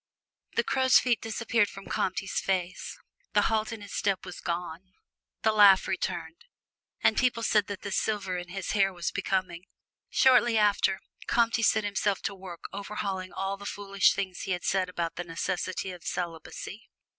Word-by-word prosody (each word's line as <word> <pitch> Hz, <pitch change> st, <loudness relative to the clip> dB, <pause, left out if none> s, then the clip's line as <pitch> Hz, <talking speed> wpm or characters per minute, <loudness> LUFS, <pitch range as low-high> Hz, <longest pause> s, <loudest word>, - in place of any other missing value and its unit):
The -, -, +3 dB
crow's 260 Hz, -1 st, +4 dB
feet 240 Hz, -3 st, +2 dB
disappeared 225 Hz, -1 st, +1 dB
from 195 Hz, 0 st, -10 dB
Comte's 190 Hz, +1 st, -1 dB
face, 185 Hz, -1 st, -2 dB, 0.4 s
the -, -, +4 dB
halt 220 Hz, 0 st, +1 dB
in 225 Hz, -2 st, -6 dB
his 205 Hz, -, -9 dB
step 195 Hz, -2 st, 0 dB
was 180 Hz, -, -8 dB
gone, 175 Hz, +1 st, -4 dB, 0.5 s
the 220 Hz, -, +4 dB
laugh 205 Hz, -3 st, +7 dB
returned, 170 Hz, -2 st, -3 dB, 0.6 s
and -, -, +5 dB
people 245 Hz, -3 st, +1 dB
said 210 Hz, -2 st, +3 dB
that 200 Hz, -1 st, -6 dB
the 200 Hz, -, -4 dB
silver 195 Hz, -2 st, -1 dB
in 175 Hz, 0 st, -4 dB
his 195 Hz, +1 st, -4 dB
hair 195 Hz, -2 st, +3 dB
was 175 Hz, -2 st, -3 dB
becoming. 185 Hz, -2 st, -2 dB, 0.4 s
Shortly 240 Hz, -3 st, +5 dB
after, 205 Hz, -2 st, +3 dB, 0.3 s
Comte 230 Hz, -1 st, +2 dB
set 220 Hz, 0 st, +3 dB
himself 205 Hz, -1 st, 0 dB
to -, -, -1 dB
work 185 Hz, -3 st, -10 dB
overhauling 195 Hz, -2 st, -4 dB
all 195 Hz, +1 st, -3 dB
the 200 Hz, 0 st, -8 dB
foolish 200 Hz, -1 st, +2 dB
things 190 Hz, -2 st, -3 dB
he 190 Hz, -, -2 dB
had 180 Hz, -, -4 dB
said 185 Hz, -1 st, +1 dB
about 170 Hz, -2 st, -3 dB
the 175 Hz, -, -2 dB
necessity 180 Hz, +2 st, -3 dB
of 175 Hz, -2 st, -10 dB
celibacy. 175 Hz, +4 st, -5 dB
195 Hz, 170 wpm, -28 LUFS, 180-210 Hz, 0.6 s, laugh